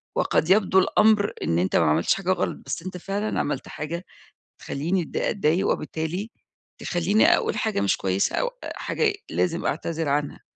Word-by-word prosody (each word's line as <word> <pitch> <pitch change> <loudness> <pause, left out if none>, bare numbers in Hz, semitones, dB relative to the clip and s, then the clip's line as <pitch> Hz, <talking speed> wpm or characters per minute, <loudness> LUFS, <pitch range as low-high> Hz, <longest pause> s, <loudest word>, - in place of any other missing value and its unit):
وقد 160 - +1
يبدو 190 -1 +5
الأمر 210 +1 +3
إن 85 +1 +1
أنت 95 - 0
ما 85 - +4
عملتش 80 +3 +3
حاجة 190 -1 -1
غلط 185 - -1
بس 165 - -4
أنت 185 -1 -6
فعلًا 200 +4 -2
عملت 145 -3 -2
حاجة 170 +5 -5 0.5
تخليني 170 +6 -1
أت - - -8
أتضايق، 180 -3 +1
وبالتالي 160 +8 -2 0.5
تخليني 180 +5 +2
أقول - - -1
حاجة 215 - 0
مش 100 - +2
كويسة 95 0 0
أو - - +1 0.2
أ - - -4
حاجة 435 -3 0 0.2
لازم 170 -1 0
أعتذر 165 -2 -2
عنها، 145 +1 -1
175 Hz, 165 wpm, -24 LUFS, 150-200 Hz, 0.5 s, يبدو